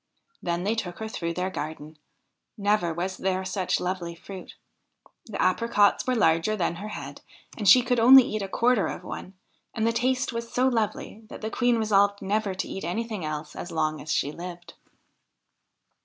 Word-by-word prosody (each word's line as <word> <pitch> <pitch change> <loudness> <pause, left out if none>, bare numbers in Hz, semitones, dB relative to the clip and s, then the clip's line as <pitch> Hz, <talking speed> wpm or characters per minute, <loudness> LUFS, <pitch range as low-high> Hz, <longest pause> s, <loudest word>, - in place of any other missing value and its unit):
Then 175 0 -2
they 205 +3 +1
took 180 -6 -4
her 220 - -5
through 170 -6 -4
their 185 +1 -2
garden. 155 -2 -6 0.6
Never 205 -4 +1
was 180 +3 -3
there 190 0 -1
such 190 -1 -1
lovely 180 -2 -3
fruit; 185 +2 -10 0.7
the 215 - -6
apricots 205 +3 +3
were 255 - +2
larger 165 0 +2
than 170 -3 -1
her 205 +4 -6
head, 215 - -7 0.3
and 205 -4 +2
she 250 +5 +8
could 245 -1 +1
only 260 +3 +9
eat 215 -2 -3
a 195 - -3
quarter 235 +2 +2
of - - -6
one, 190 - -8 0.4
and 220 -1 0
the 230 - +2
taste 255 +2 0
was 230 0 -5
so 255 +1 +2
lovely 225 -2 -2
that - - -10
the 220 0 -4
Queen 245 -1 +2
resolved 200 -2 +3
never 200 0 -1
to - - -3
eat 195 - -6
anything 215 +2 -3
else 155 0 -5
as 175 - -6
long 155 -1 -1
as 155 - -5
she 145 - +1
lived. 175 0 -9
195 Hz, 185 wpm, -26 LUFS, 175-225 Hz, 0.7 s, only